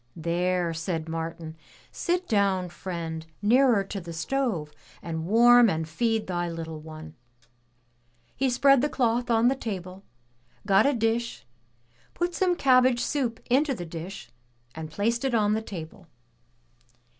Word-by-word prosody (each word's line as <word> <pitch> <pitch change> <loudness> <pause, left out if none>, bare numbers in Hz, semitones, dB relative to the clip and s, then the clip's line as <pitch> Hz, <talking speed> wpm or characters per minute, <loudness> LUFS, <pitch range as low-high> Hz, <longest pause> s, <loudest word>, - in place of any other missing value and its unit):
"There,'' 175 +1 0
said 160 0 -3
Martin, 165 0 -5 0.4
"Sit 360 +1 -1
down, 195 -4 +1
friend, 170 -3 -5 0.2
nearer 235 0 +4
to 195 0 -6
the 170 -1 -8
stove, 170 - -2 0.3
and 160 -1 -5
warm 240 +2 +6
and 160 -2 -2
feed 225 +6 0
thy 175 -1 -2
little 165 -1 -6
one." 155 0 -10 1.2
He 270 0 +1
spread 275 +1 +4
the 295 - +1
cloth 245 -4 0
on 230 0 +4
the 265 - +3
table, 190 -6 -6 0.6
got 200 +4 +4
a 285 - +3
dish, 230 +1 -1 0.7
put 350 0 -1
some 360 0 +1
cabbage 255 -4 +4
soup 250 -6 -2
into 270 +2 +2
the 175 - -6
dish, 165 -5 -8 0.4
and 160 -1 -7
placed 225 - -1
it 265 -3 0
on 210 -1 +2
the 220 - 0
table. 175 -3 -9
200 Hz, 140 wpm, -26 LUFS, 165-245 Hz, 1.2 s, warm